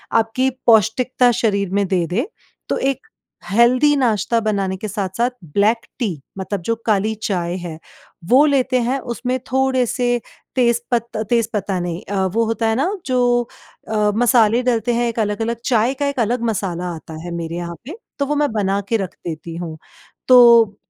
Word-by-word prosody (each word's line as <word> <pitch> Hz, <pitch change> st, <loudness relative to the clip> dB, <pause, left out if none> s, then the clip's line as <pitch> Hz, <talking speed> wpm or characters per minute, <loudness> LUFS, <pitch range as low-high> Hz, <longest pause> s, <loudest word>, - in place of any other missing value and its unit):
आपकी 230 Hz, +4 st, +2 dB, 0.2 s
पौष्टिकता 240 Hz, +3 st, +4 dB
शरीर 200 Hz, -4 st, 0 dB
में 200 Hz, 0 st, +2 dB
दे 180 Hz, -3 st, +1 dB
दे, 230 Hz, -, -1 dB, 0.4 s
तो -, -, 0 dB
एक 275 Hz, -, -2 dB, 0.4 s
हेल्दी 250 Hz, +7 st, +4 dB
नाश्ता 230 Hz, -3 st, +1 dB
बनाने 200 Hz, -3 st, -1 dB
के 215 Hz, -, -5 dB
साथ-साथ 200 Hz, +4 st, -1 dB, 0.2 s
ब्लैक 220 Hz, +3 st, +2 dB
टी 230 Hz, -5 st, 0 dB, 0.3 s
मतलब 190 Hz, 0 st, -4 dB
जो 230 Hz, +6 st, -1 dB
काली 215 Hz, 0 st, +1 dB
चाय 175 Hz, -3 st, -1 dB
है 175 Hz, -3 st, -7 dB, 0.5 s
वो 270 Hz, +5 st, +6 dB
लेते 260 Hz, -3 st, +2 dB
हैं 260 Hz, +3 st, 0 dB
उसमें 250 Hz, +1 st, -3 dB
थोड़े 265 Hz, -1 st, +2 dB
से 245 Hz, 0 st, 0 dB, 0.4 s
तेज 235 Hz, -2 st, +2 dB
पत्ता 235 Hz, -2 st, -1 dB
तेज 230 Hz, +1 st, +1 dB
पत्ता 195 Hz, -2 st, -1 dB
नहीं 175 Hz, +1 st, -4 dB
अ, 195 Hz, -1 st, -1 dB
वो 225 Hz, +5 st, 0 dB
होता 225 Hz, 0 st, -1 dB
है 220 Hz, -, +1 dB
ना 280 Hz, +9 st, +1 dB, 0.2 s
जो 245 Hz, -2 st, +2 dB, 0.5 s
अ, 210 Hz, -1 st, +1 dB
मसाले 235 Hz, -1 st, +4 dB
डालते 240 Hz, -1 st, +1 dB
हैं 240 Hz, +1 st, +1 dB
एक 230 Hz, -, -4 dB
अलग 210 Hz, 0 st, -1 dB
अलग, 230 Hz, +1 st, -1 dB
चाय 240 Hz, +1 st, +2 dB
का 285 Hz, +1 st, -2 dB
एक 280 Hz, -2 st, -3 dB
अलग 235 Hz, +1 st, 0 dB
मसाला 180 Hz, -3 st, -3 dB
आता 160 Hz, 0 st, -11 dB
है 175 Hz, -, -6 dB
मेरे 170 Hz, 0 st, -4 dB
यहाँ 170 Hz, 0 st, -5 dB
पे, 315 Hz, +9 st, -7 dB, 0.2 s
तो 280 Hz, -, +1 dB
वो 295 Hz, +2 st, -1 dB
मैं 295 Hz, -3 st, +1 dB
बना 200 Hz, -2 st, 0 dB
के 230 Hz, -, +2 dB
रख 190 Hz, -5 st, -4 dB
देती 165 Hz, +1 st, -6 dB
हूँ। 165 Hz, -2 st, -6 dB, 0.5 s
तो 235 Hz, -4 st, +7 dB
225 Hz, 180 wpm, -19 LUFS, 195-245 Hz, 0.5 s, तो